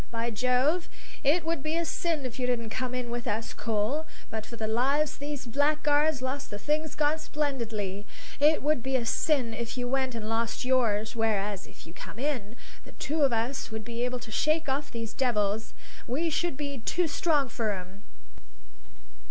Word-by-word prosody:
By 230 Hz, 0 st, -1 dB
Jove, 255 Hz, -, +2 dB, 0.3 s
it 310 Hz, +4 st, +4 dB
would 325 Hz, -3 st, 0 dB
be 310 Hz, +2 st, -1 dB
a 340 Hz, -, +1 dB
sin 325 Hz, -4 st, 0 dB
if 255 Hz, 0 st, -5 dB
you 250 Hz, -, +1 dB
didn't 230 Hz, -3 st, -1 dB
come 255 Hz, +1 st, -2 dB
in 245 Hz, -1 st, -2 dB
with 240 Hz, +1 st, -3 dB
us, 220 Hz, +1 st, -1 dB
Cole; 230 Hz, +8 st, 0 dB, 0.2 s
but 220 Hz, -1 st, -4 dB
for 235 Hz, -, -7 dB
the 225 Hz, -, -2 dB
lives 270 Hz, +7 st, +2 dB
these 285 Hz, -2 st, -4 dB
blackguards 290 Hz, +2 st, +3 dB
lost 275 Hz, +2 st, -2 dB
the 205 Hz, -, -4 dB
thing's 305 Hz, +7 st, 0 dB
gone 305 Hz, +1 st, +2 dB
splendidly; 225 Hz, -11 st, -2 dB, 0.3 s
it 300 Hz, +1 st, +5 dB
would 300 Hz, -3 st, +3 dB
be 265 Hz, +2 st, -1 dB
a 240 Hz, -3 st, +2 dB
sin 255 Hz, -3 st, +2 dB
if 235 Hz, +2 st, -4 dB
you 245 Hz, 0 st, -1 dB
went 260 Hz, -1 st, 0 dB
and 220 Hz, -2 st, -4 dB
lost 230 Hz, +2 st, 0 dB
yours, 225 Hz, -5 st, +2 dB
whereas, 210 Hz, -3 st, 0 dB
if -, -, -14 dB
you 165 Hz, -, -11 dB
come 200 Hz, -, -9 dB
in, 245 Hz, -5 st, -2 dB, 0.3 s
the -, -, -13 dB
two 305 Hz, +3 st, -1 dB
of 275 Hz, -3 st, +5 dB
us 235 Hz, +4 st, -1 dB
would 220 Hz, -1 st, -5 dB
be 235 Hz, +1 st, -2 dB
able 250 Hz, 0 st, 0 dB
to 235 Hz, -2 st, -9 dB
shake 310 Hz, +7 st, +2 dB
off 280 Hz, +2 st, 0 dB
those 230 Hz, -1 st, -5 dB
devils: 220 Hz, -4 st, +1 dB, 0.4 s
we 320 Hz, +7 st, 0 dB
should 315 Hz, -1 st, 0 dB
be 285 Hz, -2 st, -3 dB
too 345 Hz, +9 st, +1 dB
strong 295 Hz, -2 st, +2 dB
for 225 Hz, -2 st, -1 dB
'em." 190 Hz, +1 st, -6 dB
255 Hz, 190 wpm, -29 LUFS, 225-295 Hz, 0.4 s, it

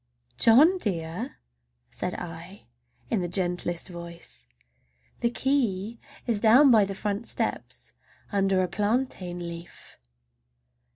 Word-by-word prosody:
"John 305 Hz, +12 st, +6 dB
dear!" 185 Hz, -, -3 dB, 0.5 s
said -, -, -3 dB
I -, -, -9 dB, 0.5 s
in 210 Hz, -, +1 dB
the 175 Hz, -, -1 dB
gentlest 175 Hz, -1 st, -1 dB
voice, 170 Hz, -, -10 dB, 0.7 s
"the 235 Hz, -, +1 dB
key 235 Hz, -5 st, 0 dB, 0.3 s
is 230 Hz, -4 st, 0 dB
down 250 Hz, +6 st, +7 dB
by 215 Hz, -3 st, +6 dB
the 195 Hz, 0 st, -5 dB
front 205 Hz, +3 st, -3 dB
steps, -, -, -4 dB, 0.4 s
under 195 Hz, -2 st, +2 dB
a -, -, 0 dB
plantain 205 Hz, -2 st, -1 dB
leaf!" 170 Hz, 0 st, -9 dB
200 Hz, 110 wpm, -27 LUFS, 175-235 Hz, 0.7 s, down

